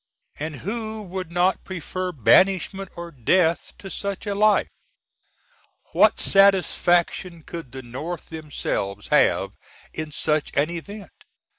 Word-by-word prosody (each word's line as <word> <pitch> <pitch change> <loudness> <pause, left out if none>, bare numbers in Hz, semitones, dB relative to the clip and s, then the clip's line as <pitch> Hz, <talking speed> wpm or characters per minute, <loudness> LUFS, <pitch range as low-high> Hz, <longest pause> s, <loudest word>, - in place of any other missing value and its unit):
And 155 0 -4
who 220 +3 -4
would 185 -2 -6
not 180 +2 +1
prefer 185 0 -4
banishment 185 - +3
or 170 0 -7
death 165 +6 +1
to 195 - -9
such 200 0 -4
a 205 - -1
life? 210 +1 +3 1.2
What - - +5
Satisfac^n 180 -3 +3
could 165 -7 -8
the 130 +1 -8
North 150 +8 -6
themselves 150 -10 -4
have - - +3 0.4
in 155 -1 -5
such 150 +1 0
an 150 +4 +2
event? 200 +5 -8
175 Hz, 120 wpm, -23 LUFS, 155-195 Hz, 1.2 s, What